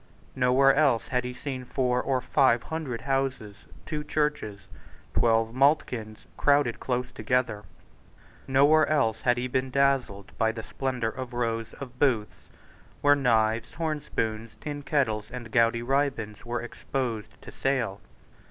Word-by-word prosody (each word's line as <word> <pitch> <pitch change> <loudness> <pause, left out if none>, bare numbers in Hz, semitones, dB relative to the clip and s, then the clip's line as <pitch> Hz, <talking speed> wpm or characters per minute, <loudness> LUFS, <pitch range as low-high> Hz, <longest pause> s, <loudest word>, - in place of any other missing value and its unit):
Nowhere 130 +2 +4
else 140 -6 +2
had 125 -1 0
he 125 - -3
seen 130 -1 -5
four 125 0 0
or 130 -2 0
five 130 -2 +3
hundred 150 -8 -4
houses, 135 -6 -1 0.3
two 150 -1 -3
churches, 150 -10 -1 0.5
twelve 115 -1 +2
maltkilns, 125 -5 +1
crowded 145 -5 +3
close 125 -1 -2
together. 120 -2 -1 0.8
Nowhere 145 +4 +5
else 115 -7 +1
had 120 -1 +2
he 125 +1 -1
been 130 +1 -1
dazzled 135 -7 0
by 110 0 +2
the 110 -1 -6
splendour 125 -4 -2
of 130 0 -7
rows 115 -1 -2
of 125 -2 -10
booths, 120 -7 0 0.5
where 145 0 +6
knives, 115 -4 +1
horn 155 -2 -2
spoons, 110 -5 -3
tin 145 -1 -5
kettles, 120 -8 0
and 120 -2 -8
gaudy 115 +1 +3
ribands 130 -5 -1
were 120 0 -2
exposed 120 -2 -4
to - - -10
sale. 115 -7 -1
125 Hz, 140 wpm, -27 LUFS, 115-140 Hz, 0.8 s, where